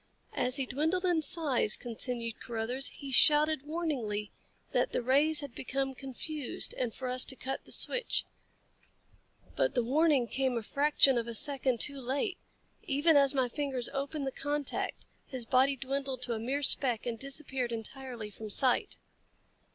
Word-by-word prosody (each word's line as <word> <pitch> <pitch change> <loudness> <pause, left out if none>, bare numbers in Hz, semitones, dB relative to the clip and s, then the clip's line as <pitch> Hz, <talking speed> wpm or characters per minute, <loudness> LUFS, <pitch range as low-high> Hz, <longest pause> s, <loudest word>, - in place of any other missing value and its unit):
"As 250 +1 0
he 270 -2 +1
dwindled 320 +9 -1
in 345 -3 +2
size," 285 -8 +1
continued 235 -1 -4
Carruthers, 240 +3 -2
"he 275 -2 -7
shouted 300 +1 +4
warningly 255 -11 -3 0.4
that - - 0
the - - 0
rays 290 +5 +3
had 280 -4 -8
become 270 +2 -3
confused 270 +2 -2
and 245 -3 -2
for 255 +3 -6
us 255 0 +4
to 265 - -4
cut 265 +1 -5
the - - -11
switch. - - +2 1.3
But - - 0
the 245 - +2
warning 280 0 +3
came 260 +2 -1
a 230 - -3
fraction 280 0 +3
of 235 - -4
a 235 - -4
second 265 -2 +3
too 280 -2 +2
late. 280 - -2 0.4
Even 295 +4 +2
as 280 0 +5
my 260 -2 +2
fingers 265 -2 -1
opened 280 +1 -3
the 270 - -2
contact, 290 +1 -3 0.2
his 255 -3 -3
body 265 +3 +3
dwindled 270 -1 -3
to 240 - 0
a 220 - -3
mere 270 +6 -2
speck 250 -5 +2
and 235 -2 -3
disappeared 270 -2 -4
entirely 230 -1 -6
from 215 +1 -8
sight." 250 +4 +3
265 Hz, 160 wpm, -31 LUFS, 245-285 Hz, 1.3 s, as